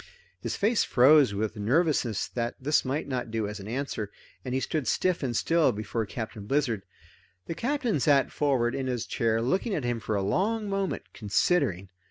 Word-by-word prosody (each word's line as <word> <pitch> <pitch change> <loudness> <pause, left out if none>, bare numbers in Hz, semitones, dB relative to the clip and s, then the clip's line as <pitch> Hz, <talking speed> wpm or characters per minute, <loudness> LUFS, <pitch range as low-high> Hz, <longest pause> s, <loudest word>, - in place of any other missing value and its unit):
His - - -3
face 215 +2 +2
froze 130 -3 +5
with 110 +2 -2
nervousness 125 - +1
that 120 -1 -3
this 145 +3 +2
might 140 +4 -2
not 125 -3 -3
do 110 -2 -1
as 105 +1 -6
an 100 - -8
answer, 115 -4 -3 0.3
and 125 -1 -3
he - - +2
stood 145 -1 -2
stiff 180 +9 +1
and 125 -5 -1
still 165 -1 +3
before 110 +1 -3
Captain 110 -2 -6
Blizzard. 135 -7 +1 0.6
The - - -4
Captain 245 - 0
sat 140 -1 +3
forward 130 -5 +1
in 135 -1 -2
his 120 -2 -2
chair 115 -1 0
looking 190 - 0
at 145 - -2
him 120 -1 -1
for 110 -1 -2
a 100 - 0
long 210 - 0
moment, 195 -1 -2
considering. 105 - +1
130 Hz, 185 wpm, -28 LUFS, 110-155 Hz, 0.6 s, froze